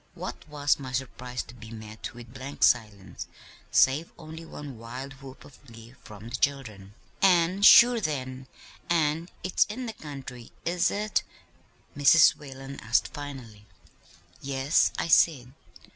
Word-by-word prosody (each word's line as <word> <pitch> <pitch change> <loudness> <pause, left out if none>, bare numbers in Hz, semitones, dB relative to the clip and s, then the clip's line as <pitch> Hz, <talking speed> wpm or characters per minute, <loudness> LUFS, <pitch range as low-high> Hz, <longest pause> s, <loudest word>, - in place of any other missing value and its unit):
What - - -8
was 145 -1 +1
my 130 -2 -7
surprise 125 -1 -4
to - - -14
be 115 -2 -12
met 110 0 -9
with 120 -1 -12
blank 135 +2 -5
silence, 100 -6 +1 0.4
save 145 +6 +3
only 160 0 -10
one 145 -6 -9
wild 125 +4 -8
whoop 135 -1 -12
of 140 - -18
glee 115 0 -13
from 105 +2 -11
the 120 - -4
children. 110 -9 -2 0.3
"'An' 185 0 +3
sure 235 +3 +8
then, 130 -5 -4 0.4
an' 165 0 +1
it's 185 - +2
in 245 +4 -6
the 225 - -5
country; 135 - -10
is 175 +1 +1
it?' 210 +1 -1 0.7
Mrs. 145 +2 +6
Whalen 135 -1 -10
asked 110 +2 +1
finally. 130 -8 -9 0.7
"'Yes,' 135 +2 +2
I - - -1
said. 135 -6 +3
135 Hz, 140 wpm, -27 LUFS, 120-155 Hz, 0.7 s, sure